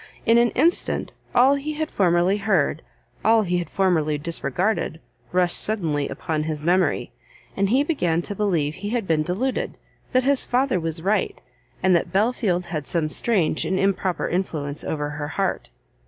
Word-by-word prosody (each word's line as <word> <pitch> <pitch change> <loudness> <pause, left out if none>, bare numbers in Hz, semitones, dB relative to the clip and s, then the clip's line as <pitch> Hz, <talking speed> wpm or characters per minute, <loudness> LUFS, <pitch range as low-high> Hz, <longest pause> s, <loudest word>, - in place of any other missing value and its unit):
In 230 +1 +5
an 240 0 +4
instant, 330 +7 +1 0.2
all 260 +3 +6
he 285 +2 -3
had 310 +1 -3
formerly 180 +1 +2
heard, 190 -7 +1 0.4
all 225 0 +4
he 180 -2 0
had 170 -3 -5
formerly 160 -6 +1
disregarded, 165 +3 -2 0.3
rushed 180 -1 +4
suddenly 160 -9 -1
upon 160 -3 -3
his 155 -1 -3
memory, 180 +3 +1 0.4
and 195 0 +1
he 260 +6 +3
began 175 - 0
to 205 - -2
believe 175 -8 0
he 205 +5 -6
had 235 -2 -1
been 160 -3 +1
deluded, 195 +12 -2 0.3
that 255 -1 +3
his 275 0 +3
father 255 -4 +1
was 165 0 -1
right, 205 +3 0 0.4
and 185 -1 +4
that 170 0 0
Belfield 195 -3 +1
had 155 -5 -5
some 160 -3 0
strange 180 -3 +1
and 190 - -1
improper 190 -2 0
influence 155 -5 -3
over 150 -1 -3
her 145 0 -5
heart. 190 +3 -2
185 Hz, 165 wpm, -23 LUFS, 160-220 Hz, 0.4 s, all